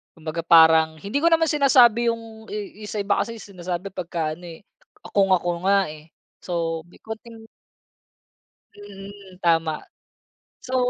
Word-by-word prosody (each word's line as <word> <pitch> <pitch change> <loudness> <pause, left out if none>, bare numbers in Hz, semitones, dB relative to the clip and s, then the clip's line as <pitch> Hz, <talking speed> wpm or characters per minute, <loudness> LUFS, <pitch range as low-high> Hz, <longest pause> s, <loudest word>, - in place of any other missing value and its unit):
kumbaga 160 0 -6
parang 160 -1 +6
hindi 205 - -2
ko 330 - +2
naman 325 -2 +3
sinasabi 245 -5 +4
yung 225 -1 -4
i- 210 0 -7
yung - - -8
sa 210 - -2
iba 200 0 +1
kasi 230 0 -3
sinasabi 185 -2 -6
pagka 170 -4 -3
ano, 175 +3 -12
eh, 165 +3 -11 0.5
"kung 195 -2 +3
ako 175 0 -3
nga, 195 -4 +3
eh," 155 0 -13 0.3
so 165 -2 -3
may 175 - -20
konting 225 +1 -9 1.3
Mhm, 200 -2 -12
tama 165 -2 +2 0.9
so 260 - -4
195 Hz, 145 wpm, -23 LUFS, 170-220 Hz, 1.3 s, parang